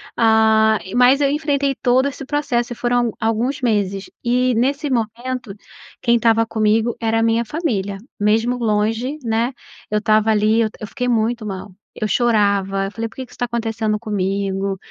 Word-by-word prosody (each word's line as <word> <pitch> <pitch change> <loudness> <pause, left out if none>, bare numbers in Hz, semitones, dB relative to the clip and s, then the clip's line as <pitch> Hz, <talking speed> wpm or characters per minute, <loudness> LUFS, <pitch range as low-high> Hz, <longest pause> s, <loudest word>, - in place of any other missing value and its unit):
ah, 220 -1 +4 0.2
mas 250 +3 +5
eu 280 - +3
enfrentei 285 -2 0
todo 255 +1 +2
esse 275 0 -6
processo 265 -4 -1
e - - -11
foram 240 -1 +1
a 225 - -3
alguns 230 +5 0
meses, 200 -5 0 0.2
e 250 +1 +2
nesse 275 +5 0
momento, 240 -1 -3 0.5
quem 235 -1 +4
estava 225 0 +3
comigo 220 +1 +1
era 225 0 +1
a - - +2
minha 230 +1 +2
família, 210 - -2 0.2
mesmo 225 +4 +2
longe, 225 +5 0
né, 230 +2 0 0.4
eu 210 - 0
estava 215 0 +2
ali 215 +1 +3
eu 220 - +1 0.2
fiquei 250 +5 -3
muito 230 -1 0
mal, 195 0 -6 0.2
eu 215 - -2
chorava 200 -4 +1
eu 195 - -5
falei: 230 +1 -4
"Por - - -20
que 260 - -6
que - - -23
isso - - -14
está 245 - -1
acontecendo 225 -2 -2
comigo? 195 -2 -2
225 Hz, 175 wpm, -20 LUFS, 215-245 Hz, 0.5 s, mas